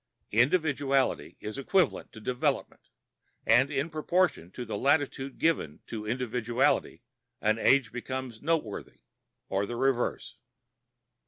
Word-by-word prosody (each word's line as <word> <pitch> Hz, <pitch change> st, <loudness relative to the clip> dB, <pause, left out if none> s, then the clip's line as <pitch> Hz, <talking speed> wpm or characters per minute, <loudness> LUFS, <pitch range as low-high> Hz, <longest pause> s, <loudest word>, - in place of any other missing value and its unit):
Individuality 140 Hz, -, +2 dB
is 105 Hz, +5 st, -5 dB
equivalent 180 Hz, +3 st, +1 dB
to 110 Hz, -, -11 dB
development, 125 Hz, +3 st, -2 dB, 0.6 s
and 125 Hz, +5 st, +5 dB
in 140 Hz, 0 st, -1 dB
proportion 165 Hz, -, 0 dB
to 120 Hz, +6 st, -7 dB
the 110 Hz, -2 st, -4 dB
latitude 140 Hz, +1 st, +1 dB
given 140 Hz, -, 0 dB
to 105 Hz, -2 st, -6 dB
individuality 120 Hz, +1 st, 0 dB, 0.4 s
an 110 Hz, +1 st, +1 dB
age 135 Hz, -2 st, +4 dB
becomes 125 Hz, -2 st, -5 dB
noteworthy 150 Hz, -9 st, -2 dB, 0.5 s
or 100 Hz, +1 st, -1 dB
the 120 Hz, -, -4 dB
reverse. 130 Hz, 0 st, 0 dB
130 Hz, 110 wpm, -29 LUFS, 115-140 Hz, 0.6 s, and